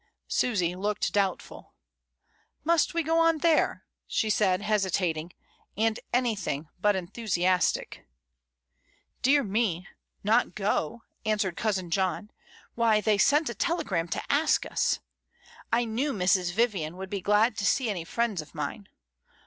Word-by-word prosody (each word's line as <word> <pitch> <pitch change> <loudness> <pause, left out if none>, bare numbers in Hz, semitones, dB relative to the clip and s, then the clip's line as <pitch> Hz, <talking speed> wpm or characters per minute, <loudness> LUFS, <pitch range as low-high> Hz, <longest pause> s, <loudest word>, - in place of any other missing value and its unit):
Susy 180 -8 0
looked 205 +2 -1
doubtful. 200 -2 -2 0.9
^^Must 335 0 +2
we 335 - +1
go 325 +2 +2
on 330 -1 +4
there?" 320 0 +2 0.2
she 220 -2 0
said, 195 -2 +2
hesitating, 180 -6 0 0.5
and 220 +1 +1
anything 205 - -1
but 205 +2 +3
enthusiastic. 185 -1 -1 1.1
"Dear 280 +2 +4
me; 200 -5 -1 0.4
not 225 +4 +2
go," 205 +1 -1 0.2
answered 210 -5 0
cousin 190 -6 -2
John, 190 +2 -1 0.4
"why 230 -2 +3
they 210 -1 +1
sent 295 +8 +4
a 235 - -2
telegram 205 - -1
to - - -3
ask 290 +3 +2
us. - - 0 0.7
I 235 +1 +2
knew 250 +6 -1
Mrs. 180 -2 +2
Vivian 185 -6 0
would 190 0 -7
be 200 -2 -2
glad 210 +4 +3
to 200 - -2
see 255 +6 +2
any 190 -6 -2
friends 220 0 -1
of 155 - -16
mine. 150 +7 -5
210 Hz, 135 wpm, -27 LUFS, 185-235 Hz, 1.1 s, on